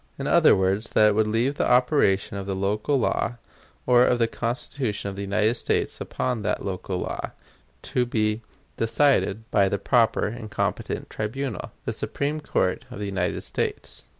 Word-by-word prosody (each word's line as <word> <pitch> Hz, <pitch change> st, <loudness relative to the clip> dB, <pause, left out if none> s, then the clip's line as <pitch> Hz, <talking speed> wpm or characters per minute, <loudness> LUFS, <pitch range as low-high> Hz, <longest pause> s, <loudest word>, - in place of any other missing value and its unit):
In -, -, -4 dB
other -, -, +6 dB
words, 95 Hz, +4 st, 0 dB
that 105 Hz, 0 st, +6 dB
it -, -, +2 dB
would 110 Hz, +1 st, +2 dB
leave 120 Hz, +6 st, 0 dB
the -, -, +1 dB
operation 125 Hz, -6 st, +3 dB
of 100 Hz, -1 st, -5 dB
the 95 Hz, -, -2 dB
local 105 Hz, +8 st, 0 dB
law, 120 Hz, -1 st, 0 dB, 0.5 s
or 125 Hz, -1 st, +6 dB
of 125 Hz, -, +3 dB
the 115 Hz, -, +3 dB
Constitution 115 Hz, -2 st, -3 dB
of 100 Hz, -, -7 dB
the 100 Hz, -, -5 dB
United 105 Hz, +3 st, +1 dB
States -, -, -1 dB
upon 125 Hz, -3 st, -2 dB
that 105 Hz, -, -2 dB
local 95 Hz, -1 st, -3 dB
law, -, -, -4 dB, 0.5 s
to 125 Hz, -1 st, 0 dB
be 110 Hz, -1 st, 0 dB, 0.4 s
decided 115 Hz, -3 st, +2 dB
by 100 Hz, -2 st, +4 dB
the 100 Hz, -, 0 dB
proper 115 Hz, +2 st, +2 dB
and 110 Hz, 0 st, -5 dB
competent -, -, -2 dB
tribunal 110 Hz, +1 st, -4 dB
the -, -, -1 dB
Supreme 145 Hz, +2 st, -2 dB
Court 95 Hz, -10 st, 0 dB
of -, -, -8 dB
the 105 Hz, -, -4 dB
United 95 Hz, -3 st, -1 dB
States." -, -, -3 dB
110 Hz, 175 wpm, -25 LUFS, 100-125 Hz, 0.5 s, other